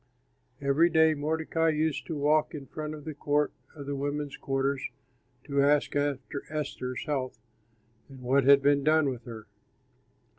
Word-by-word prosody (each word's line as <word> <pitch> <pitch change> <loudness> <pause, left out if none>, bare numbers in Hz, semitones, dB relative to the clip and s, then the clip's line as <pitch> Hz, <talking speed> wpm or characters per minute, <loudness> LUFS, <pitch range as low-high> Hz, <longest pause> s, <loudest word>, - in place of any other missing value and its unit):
Every 140 +5 +3
day 160 -1 +4
Mordecai 160 +2 0
used 155 -1 -1
to 160 - -3
walk 150 +2 +2
in 140 -2 -7
front 155 +2 -6
of 150 - -11
the 155 - -5
court 145 0 0 0.2
of 145 -2 -8
the 140 0 -3
women's 145 +1 -3
quarters 135 -1 -1 0.6
to 140 -1 0
ask 145 +1 +2
after 145 -1 -2
Esther's 140 -4 -4
health 135 -6 -2 0.7
and 135 -1 -12
what 135 +2 +2
had 140 0 +7
been 140 0 +3
done 155 -1 +4
with 125 -3 -6
her. 110 -3 -8
145 Hz, 155 wpm, -28 LUFS, 140-155 Hz, 0.7 s, had